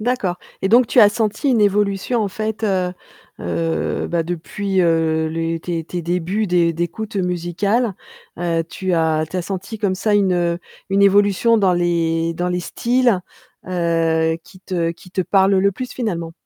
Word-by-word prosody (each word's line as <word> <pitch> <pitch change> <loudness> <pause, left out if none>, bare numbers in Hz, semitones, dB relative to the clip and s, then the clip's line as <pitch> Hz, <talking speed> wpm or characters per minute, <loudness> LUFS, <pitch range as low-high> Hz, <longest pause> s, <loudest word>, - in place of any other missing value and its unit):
D'accord, 215 -6 -1 0.3
et 190 - +1
donc 240 +3 +5
tu 245 - +4
as 210 - +8
senti 215 +5 -1
une 235 -4 +3
évolution, 205 +3 +1
en 200 - -1
fait, 220 +2 -4
heu 185 -3 0 0.5
heu, 165 -1 -1
bah, 170 -1 0
depuis, 185 +3 -2
heu, 160 -2 +2
les 165 +1 -2
tes 165 0 -3
tes 175 +2 -5
débuts 180 +5 -1
d'é 175 -2 +2
d'écoute 175 +6 -4
musicale, 185 +5 0 0.4
heu, 170 -1 0
tu 185 -1 -3
as 160 -1 +1
tu 185 - -5
as 180 - -1
senti, 195 +4 -5
comme 200 -3 -1
ça, 210 +2 +1
une, 195 -2 +3
heu, 175 -1 0 0.3
une 195 +1 +2
évolution 205 +3 +4
dans 190 -3 +3
les 165 -1 +1
dans 175 +2 -2
les 180 0 -1
styles, 240 0 +1 0.5
heu, 165 -2 +1
qui 185 - -16
te 175 -3 -1
qui 180 +1 -17
te 190 - -1
parlent 195 +2 +3
le 200 +1 +3
plus, 255 +6 -6
finalement? 170 -9 -3
185 Hz, 175 wpm, -20 LUFS, 170-205 Hz, 0.5 s, as